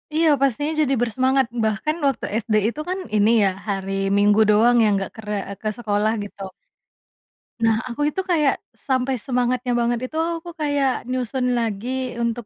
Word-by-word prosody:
Iya 320 0 +4
pastinya 285 +3 +1
jadi 275 -3 +2
bersemangat 260 +3 +2 0.2
bahkan 220 +9 -1
waktu 275 - -1 0.2
SD 220 -1 -1
itu 265 - -8
kan 370 +1 -2 0.2
ini 210 +1 +4
ya 195 - +4 0.2
hari 195 -1 -2 0.3
Minggu 205 +1 +4
doang 225 +3 +5
ya - - +4
enggak 195 -1 -2
ker 220 - -10
eee, 200 0 -5
ke 215 - -1
sekolah 210 -2 0
gitu. 195 -1 -8 1.1
Nah 225 -1 +4
aku 250 +3 -5
itu 380 - -2
kayak, 300 -5 +3 0.3
sampai 260 0 +1
semangatnya 250 0 0
banget 235 0 +1
itu 310 - -13 0.2
aku 330 +1 -8
kayak 285 -3 0
nyusun 255 0 -2
lagi 240 +3 -2
untuk 235 0 -2
245 Hz, 165 wpm, -22 LUFS, 215-270 Hz, 1.1 s, doang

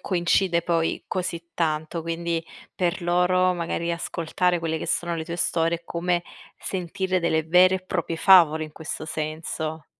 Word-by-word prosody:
coincide 175 -1 +1
poi 165 -1 0
così 170 -2 -4
tanto, 160 0 -1
quindi 165 0 -2 0.3
per 175 -2 -1
loro 180 +1 +3
magari 170 0 -2
ascoltare 170 +1 -1
quelle 165 -1 -2
che - - -5
sono 175 0 -1
le 160 -1 -4
tue 170 +1 -5
storie 165 0 +1
è 170 - -29
come 175 +1 -1 0.4
sentire 185 0 -2
delle 160 -2 +1
vere 180 +3 +5
e - - -8
proprie 175 -2 -3
favole 160 -4 +6
in 155 - -11
questo 160 0 -6
senso. 155 0 -4
170 Hz, 155 wpm, -24 LUFS, 160-180 Hz, 0.4 s, favole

